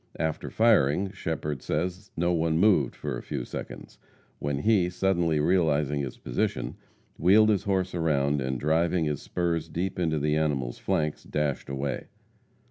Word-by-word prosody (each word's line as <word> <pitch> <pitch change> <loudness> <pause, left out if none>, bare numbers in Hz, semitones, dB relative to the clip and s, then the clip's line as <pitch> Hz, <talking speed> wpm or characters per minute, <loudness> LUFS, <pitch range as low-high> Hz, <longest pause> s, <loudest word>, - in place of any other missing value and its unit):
After 80 0 -2
firing, 100 -5 +3
Shepherd 80 -7 -4
says 90 +6 -3
no 85 +1 +2
one 80 -1 +1
moved 90 - +3
for - - -4
a - - -8
few - - -4
seconds, - - -8 0.4
when 70 -1 -2
he, 95 +2 +3
suddenly 85 -4 +1
realizing 75 -4 +2
his 65 -3 -5
position, - - -2 0.4
wheeled 105 +6 +6
his 100 -4 +1
horse 95 -2 0
around, 75 -4 +1
and 65 -1 -2
driving 80 +3 +1
his 75 -2 -2
spurs 85 -2 -2
deep 90 +2 -3
into 80 -3 +1
the 75 +1 +1
animal's 70 -6 -1
flanks, 75 -1 -1
dashed 75 -3 -2
away. 70 0 -3
80 Hz, 150 wpm, -27 LUFS, 75-90 Hz, 0.4 s, wheeled